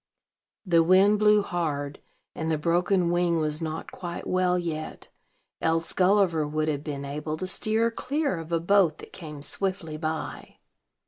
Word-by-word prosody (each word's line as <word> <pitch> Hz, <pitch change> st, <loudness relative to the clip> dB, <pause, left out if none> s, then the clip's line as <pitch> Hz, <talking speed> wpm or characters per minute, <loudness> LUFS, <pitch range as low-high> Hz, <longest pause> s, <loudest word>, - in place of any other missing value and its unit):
The 170 Hz, -3 st, +4 dB
wind 190 Hz, +5 st, +5 dB
blew 210 Hz, -1 st, +5 dB
hard, 150 Hz, -6 st, -3 dB, 0.3 s
and 160 Hz, 0 st, -3 dB
the 160 Hz, -, +1 dB
broken 175 Hz, +3 st, +1 dB
wing 175 Hz, -1 st, +2 dB
was 155 Hz, 0 st, -2 dB
not 160 Hz, 0 st, -5 dB
quite 175 Hz, -1 st, -6 dB
well 185 Hz, -1 st, +1 dB
yet, 160 Hz, -3 st, -5 dB, 0.5 s
else 165 Hz, 0 st, +1 dB
Gulliver 180 Hz, -5 st, +3 dB
would 155 Hz, +1 st, -1 dB
have 145 Hz, -1 st, -2 dB
been 140 Hz, -2 st, -5 dB
able 150 Hz, +2 st, -4 dB
to 185 Hz, -, -4 dB
steer 220 Hz, +4 st, +2 dB
clear 280 Hz, -, -2 dB
of 165 Hz, +1 st, -9 dB
a 165 Hz, -, +2 dB
boat 175 Hz, -2 st, +3 dB
that -, -, -13 dB
came 150 Hz, -4 st, -9 dB
swiftly 185 Hz, -3 st, 0 dB
by. 155 Hz, 0 st, -5 dB
170 Hz, 155 wpm, -26 LUFS, 155-185 Hz, 0.5 s, wind